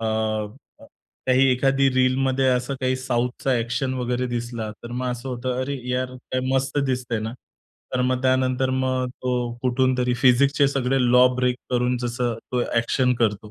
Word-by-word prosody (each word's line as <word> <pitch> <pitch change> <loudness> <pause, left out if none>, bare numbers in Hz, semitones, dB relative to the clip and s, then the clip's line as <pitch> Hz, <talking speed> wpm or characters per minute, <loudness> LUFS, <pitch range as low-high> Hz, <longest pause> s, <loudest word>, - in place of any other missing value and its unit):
अ, 115 - -4 1.2
काही 130 +1 +4
एखादी 135 +2 +3
रीलमध्ये 130 +1 +2
असं 125 +2 0
काही 130 0 +1
साउथचा 125 0 -1
ॲक्शन 120 +3 -1
वगैरे 125 0 -1
दिसला, 120 -2 -4
तर 120 - -8
मग 125 +1 -3
असं 125 +2 -5
होतं, 125 0 -3
अरे, 140 +1 -3
यार 125 0 -2
काय 130 0 -4
मस्त 135 +1 0
दिसतंय 125 -3 -1
ना. 110 +1 -4 0.6
तर 125 - +1
मग 130 0 0
त्यानंतर 130 0 +2
मग 130 -1 0
तो 125 -1 -1
कुठूनतरी 125 -1 +1
फिजिक्सचे 140 +3 +4
सगळे 135 -1 0
लॉ 125 +1 +7
ब्रेक 125 0 +1
करून 125 0 +1
जसं 120 0 -1 0.2
तो 125 -1 +1
ॲक्शन 125 +2 +2
करतो. 105 -2 -1
125 Hz, 155 wpm, -23 LUFS, 125-130 Hz, 1.2 s, लॉ